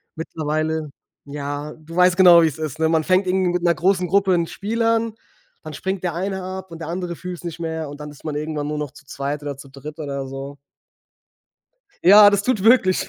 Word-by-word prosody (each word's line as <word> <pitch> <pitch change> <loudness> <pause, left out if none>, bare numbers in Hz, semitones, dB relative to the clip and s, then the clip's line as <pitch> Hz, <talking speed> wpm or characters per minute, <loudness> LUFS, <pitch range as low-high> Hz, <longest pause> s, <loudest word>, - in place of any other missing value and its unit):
mittlerweile 155 -1 -2 0.4
ja, 145 +1 -5
du 160 +2 -12
weißt 180 0 +4
genau, 175 -3 +8
wie's 160 -2 0
ist, 155 -1 -4
ne? 160 - +2
Man 160 -1 +2
fängt 185 +1 +3
irgendwie 185 -1 +1
mit 180 0 -1
'ner 170 - +4
großen 180 +2 +1
Gruppe 195 +1 +3
'n 170 -1 +2
Spiel 225 +6 -3
an, 230 -1 +1 0.5
dann 155 - -8
springt 190 +5 -4
der 175 -3 -1
eine 190 +2 -3
ab 190 0 -6
und 165 - -9
der 165 - -6
andere 175 0 -4
fühlt's 180 0 -8
nicht 170 -1 -6
mehr 160 -2 -4
und 145 +1 -10
dann 150 0 -8
ist 145 - -16
man 155 -2 -4
irgendwann 150 -1 -3
nur 150 0 -3
noch 150 -3 -4
zu 145 0 -17
zweit 140 +2 -4
oder 145 -2 -5
zu 140 0 -12
dritt 145 +3 -10
oder 140 -3 -4
so. 135 +1 -7 1.5
Ja, 205 +3 +9
das 205 -1 +1
tut 235 -5 0
wirklich 225 -6 +4
165 Hz, 215 wpm, -21 LUFS, 150-185 Hz, 1.5 s, Ja